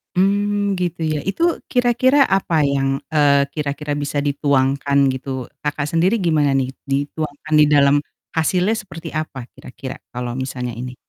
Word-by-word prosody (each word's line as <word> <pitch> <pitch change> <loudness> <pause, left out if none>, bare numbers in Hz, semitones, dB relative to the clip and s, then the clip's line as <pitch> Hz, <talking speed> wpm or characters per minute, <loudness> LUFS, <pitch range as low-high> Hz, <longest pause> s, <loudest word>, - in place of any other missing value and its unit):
Mmm, 200 +1 +1
gitu 175 -2 -3
ya. 155 -1 -1
Itu 335 - 0
kira-kira 255 +3 +4
apa 165 -6 +2
yang, 135 -1 0 0.2
eee, 140 -2 +4
kira-kira 145 0 -3
bisa 145 0 -2
dituangkan 140 -1 +2
gitu, 130 -1 -3 0.2
Kakak 150 0 -2
sendiri 180 +8 +2
gimana 155 -5 +2
nih, 135 -1 0
dituangkan 145 +2 -3
di 150 - +7
dalam 140 -1 +5 0.4
hasilnya 180 +6 +2
seperti 180 -6 -8
apa 140 -5 -4
kira-kira 130 +1 -8 0.2
kalau 125 0 -4
misalnya 125 -2 -4
ini? 125 +2 -6
145 Hz, 140 wpm, -20 LUFS, 135-180 Hz, 0.4 s, di